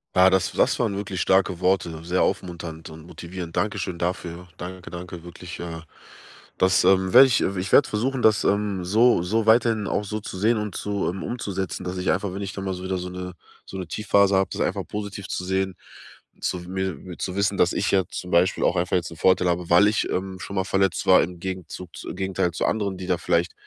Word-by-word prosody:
Ja, 95 +1 +7
das 95 -1 +1
das - - +2
waren 110 -4 0
wirklich 100 -2 -3
starke 95 -2 +2
Worte, 90 -3 0
sehr 90 +2 +1
aufmunternd 85 -3 -3
und 80 +1 -12
motivierend. 85 0 -7
Dankeschön 100 -4 -1
dafür. 90 0 -4
Danke, 90 -1 -8
danke 85 -1 -8
wirklich, 85 0 -9
äh, 85 -1 -6 0.8
dass, 95 0 +4
ähm, 95 0 +3
werde 130 +2 +10
ich 125 - +2
ich 95 0 -2
werde 145 - +6
versuchen, 125 +5 -1
das, 110 -2 +4
ähm, 100 -3 0
so 110 0 +4
so 110 +5 0
weiterhin 110 -2 +4
auch - - -1
so 105 +2 -3
zu 100 -2 -7
sehen 110 +4 +2
und 105 -3 -4
zu 100 -1 -2
ähm, 95 +2 -5
umzusetzen, 95 -6 -4
dass 90 +1 -4
ich 90 - +1
einfach, 95 +1 -1
wenn 100 +1 -4
ich 95 - -5
dann 95 - -5
mal 95 -1 -2
so 90 - -8
wieder 95 0 -2
so 90 - -5
'ne 90 0 -6 0.3
so 95 - -8
'ne 90 -3 -5
Tiefphase 100 0 +2
hab, 95 -1 +1
das - - -4
einfach - - -1
positiv 100 -1 -6
zu - - -3
sehen, 95 0 -1 0.7
zu 90 - -1
mir 95 0 -5
zu 90 - -3
wissen, 100 0 +1
dass 90 - +3
ich 95 - 0
ja 95 -1 +3
zum 90 - -6
Beispiel 90 +2 +3
auch - - +2
einfach 90 +1 0
jetzt 85 - -3
'n 85 - -10
Vorteil 90 +1 +3
habe, 85 0 -1
weil 95 +5 +7
ich, 105 - +1
ähm, 95 0 -3
schon 100 - -7
mal 95 - +1
verletzt 95 -1 +1
war - - +7
im 90 +1 -6
Gegenzug 90 -1 -6
zu - - -7
im - - -6
Gegenteil 95 -2 0
zu 85 - -2
anderen, 100 -3 -1
die 90 0 -7
da 90 - +1
vielleicht 85 +1 0
95 Hz, 225 wpm, -24 LUFS, 90-100 Hz, 0.8 s, werde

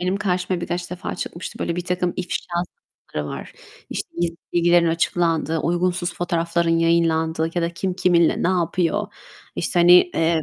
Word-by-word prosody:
benim 185 +2 0
karşıma 180 -2 -1
birkaç 175 +1 -4
defa 180 - -5
çıkmıştı. 170 - -6
Böyle 170 - -2
birtakım 180 0 -1
ifşa 180 -1 -2 0.7
sayfaları 75 -1 -3
var. - - -9 0.4
İşte, - - -4
gizli 170 -1 -1 0.2
bilgilerin 175 0 +4
açıklandığı, 165 -1 +1
uygunsuz 175 +2 0
fotoğrafların 170 -1 0
yayınlandığı 165 -1 +2
ya 175 - 0
da 170 - 0
kim 180 +1 -3
kiminle 175 -3 +3
ne 175 - +2
yapıyor, 175 -2 0 0.5
işte, 175 - +1
hani, 175 +1 +7 0.2
eee, 165 -1 +2
170 Hz, 150 wpm, -22 LUFS, 165-180 Hz, 0.7 s, hani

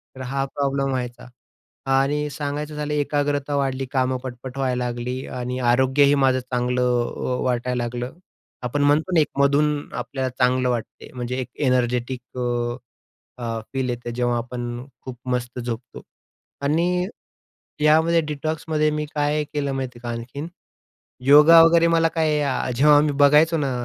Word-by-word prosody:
तर 130 - -9
हा 135 +2 -2
प्रॉब्लेम 140 0 -1
व्हायचा. 125 -2 -4 0.6
आणि 145 +2 +1
सांगायचं 145 +1 -4
झालं, 150 0 -3
एकाग्रता 145 -1 0
वाढली, 135 -1 -1
कामं 130 -1 +1
पटपट 130 +1 -8
व्हायला 125 -2 0
लागली. 125 +2 -4
आणि 125 0 -4
आरोग्यही 130 +3 +4
माझं 135 -2 +3
चांगलं 125 0 -1 0.3
अ, 125 0 -2
वाटायला 125 -1 -1
लागलं. 120 +1 -4 0.5
आपण 135 +4 -1
म्हणतो 150 +5 +2
ना, 160 - +6
एक - - +1
मधून 145 +1 +2
आपल्याला 130 -2 -3
चांगलं 125 0 +1
वाटते, 120 -2 -4
म्हणजे 125 0 -4
एक - - -5 0.2
एनर्जेटिक 125 0 0 1.2
अ, 115 -2 -3
फील 130 -1 -1
येते. 120 -1 -4
जेव्हा 120 0 0
आपण 120 +1 -5 0.2
खूप 125 -2 -7
मस्त 125 0 -2
झोपतो. 120 0 -6 0.6
आणि 175 +5 +1 0.7
यामध्ये 160 +2 +4
डिटॉक्समध्ये 155 +1 -1
मी 150 0 -2
काय 150 +1 +1
केलं 140 -2 -1
माहिती 130 -2 -4
आहे - - -22
का 120 - -4
आणखीन? 120 +7 -5 0.8
योगा 150 +4 +8
वगैरे, 170 0 +5
मला 165 0 +3
काय 155 -2 +1 0.3
जेव्हा 145 +3 +6
मी 150 -1 +1
बघायचो 150 +3 +5
ना 140 -3 -1
135 Hz, 145 wpm, -23 LUFS, 125-150 Hz, 1.2 s, योगा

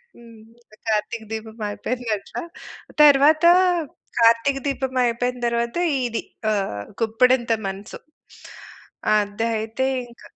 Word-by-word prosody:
హ్మ్. 230 -1 -15 0.5
'కార్తీక 220 +1 -1
దీపం' 220 0 -7
అయిపోయిందట్లా. 220 -1 -4 0.6
తరువాత 300 +2 +6 0.7
'కార్తీక 230 +4 +4
దీపం' 265 -2 -2
అయిపోయిన 245 +1 -1
తరువాత 235 +3 -1 0.3
ఇది 230 -1 -2 0.3
ఆహ్, 195 - -2 0.2
గుప్పెడంత 240 +2 +2 0.2
మనసు. 195 +3 -7 1.2
అదయితే 220 +3 -1 0.2
ఇంక 235 0 -18
230 Hz, 85 wpm, -22 LUFS, 220-250 Hz, 1.2 s, తరువాత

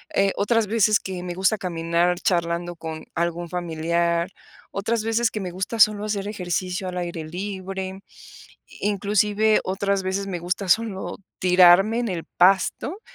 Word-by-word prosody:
eh, 195 0 +3
otras 225 +2 +2
veces 215 -1 +3
que 185 -2 -6
me 175 -1 -4
gusta 190 +4 +1
caminar 170 0 0
charlando 175 -2 -1
con 160 -1 -7
algún 170 0 -2
familiar, 170 +1 -1 0.4
otras 220 +3 -1
veces 225 +1 +1
que 215 - -4
me 180 -2 -4
gusta 190 +5 -4
solo 215 -1 +5
hacer 205 -1 -2
ejercicio 185 0 -3
al 180 - -4
aire 170 -2 -4
libre, 190 +2 -5 0.8
inclusive 210 +1 +2
otras 195 +1 0
veces 195 +1 -2
me 180 -3 -3
gusta 180 +2 -3
solo 215 -1 0 0.2
tirarme 185 +5 +6
en 240 - -1
el 170 -3 -3
pasto 195 - +2
190 Hz, 145 wpm, -23 LUFS, 175-205 Hz, 0.8 s, tirarme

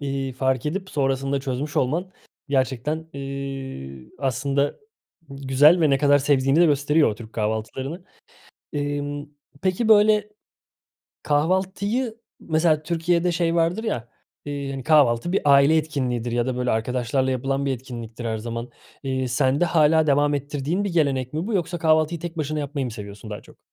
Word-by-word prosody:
iii, 135 -2 -3
fark 130 +1 0
edip 185 +4 -3
sonrasında 135 0 0
çözmüş 135 +2 -4
olman 165 +9 0 0.4
gerçekten, 140 +4 -1
ııı, 135 - -6
aslında 140 +1 0 0.5
güzel 140 +5 +4
ve 155 -3 +4
ne 135 - +3
kadar 145 -1 +4
sevdiğini 140 +2 +2
de 175 - +6
gösteriyor 150 +1 +3
o - - -4
Türk 115 0 -12
kahvaltılarını. 115 - -3 0.7
Imm, 145 0 -3 0.4
peki, 190 +4 0
böyle, 210 -1 +5 1.0
kahvaltıyı... 190 - 0 0.2
Mesela 155 -1 +1
Türkiye'de 170 +1 +1
şey 170 0 0
vardır 170 +7 +1
ya, 120 - -3 0.4
ııı, 140 -1 -4
hani, 135 -2 -5
kahvaltı 145 -1 +3
bir 195 - +1
aile 140 +3 +6
etkinliğidir 125 -6 -2
ya 120 0 +1
da, 130 -1 -2
böyle, 125 0 0
arkadaşlarla 125 +3 0
yapılan 135 +2 -1
bir 135 - +1
etkinliktir 120 -2 -8
her 110 -1 -1
zaman. 115 +2 -5 0.3
Iıı, 130 -1 -1
sende 135 +5 +2
hâlâ 160 -1 +3
devam 145 +1 +3
ettirdiğin 145 +6 -2
bir 195 -4 -3
gelenek 135 -5 +1
mi 165 +7 -2
bu 230 - -2
yoksa 175 -2 -1
kahvaltıyı 160 0 +2
tek 170 0 -6
başına 155 0 -2
yapmayı 140 -2 -3
mı 120 - -4
seviyorsun 105 0 -9
daha 105 - -6
çok? - - -18
140 Hz, 155 wpm, -23 LUFS, 130-160 Hz, 1.0 s, de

